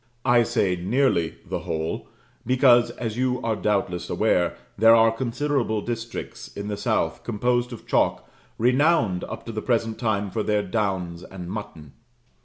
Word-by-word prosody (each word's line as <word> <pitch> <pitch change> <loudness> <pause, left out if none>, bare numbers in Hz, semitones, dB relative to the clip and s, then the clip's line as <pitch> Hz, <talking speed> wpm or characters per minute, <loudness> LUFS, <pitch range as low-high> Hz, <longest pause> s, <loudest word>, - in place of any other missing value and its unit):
I 120 -2 +5
say 95 -5 +1
"nearly" 90 - +1
the - - -2
whole, 80 0 -3 0.4
because, 125 -1 +5
as 115 -2 -5
you 125 0 +1
are 115 -1 0
doubtless 100 -5 -1
aware, - - +1 0.2
there 115 +2 +7
are 115 0 +5
considerable 120 -1 -1
districts 115 +1 -5
in 100 +1 -7
the 105 - -2
south - - -1
composed 120 +2 0
of 120 - -9
chalk - - +1 0.3
renowned 125 - +2
up - - -8
to 115 - -5
the 110 -1 -4
present 115 -2 0
time 105 -4 -1
for 110 - -1
their 105 -1 +1
downs 95 -4 -2
and 90 -1 -8
mutton. 95 -9 -7
110 Hz, 155 wpm, -24 LUFS, 100-120 Hz, 0.4 s, there